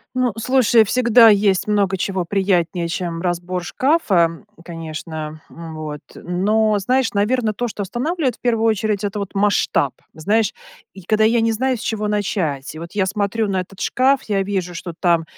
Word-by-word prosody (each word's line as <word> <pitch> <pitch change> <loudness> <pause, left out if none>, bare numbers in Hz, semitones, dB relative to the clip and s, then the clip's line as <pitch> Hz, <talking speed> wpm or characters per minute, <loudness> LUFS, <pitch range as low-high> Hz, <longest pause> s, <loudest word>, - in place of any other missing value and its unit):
Ну, 255 -2 +1
слушай, 240 -2 +4
всегда 235 0 +5
есть 200 -2 +3
много 200 -2 +1
чего 190 -1 -1
приятнее, 175 -3 0
чем 170 -1 -3
разбор 180 0 -2
шкафа, 185 - +1 0.2
конечно, 160 -2 -7
м, 165 -1 -9
вот, 150 -1 -6
но, 210 +4 +1
знаешь, 255 +5 +1
наверно, 215 +2 +1
то, 240 +3 -3
что 205 - -5
останавливает, 255 - -2
в - - -48
первую 230 -2 +1
очередь- 215 -2 0
это, 205 +1 -2
вот, 200 0 -5
масштаб. 195 -9 +1 0.2
Знаешь, 210 +7 0 0.4
я 190 - -11
когда 215 0 +3
я 230 +1 +3
не 225 - +2
знаю, 260 +3 0
с 225 - -10
чего 215 -2 -2
начать. 175 -10 -2
И - - -8
вот 170 +1 -8
я 200 -2 +1
смотрю 205 +2 -1
на 190 -1 0
этот 185 +1 -10
шкаф, 265 +1 +2
я 200 -2 0
вижу, 190 -3 -3
что 170 0 -6
там, 170 -3 +2
200 Hz, 175 wpm, -20 LUFS, 175-225 Hz, 0.4 s, всегда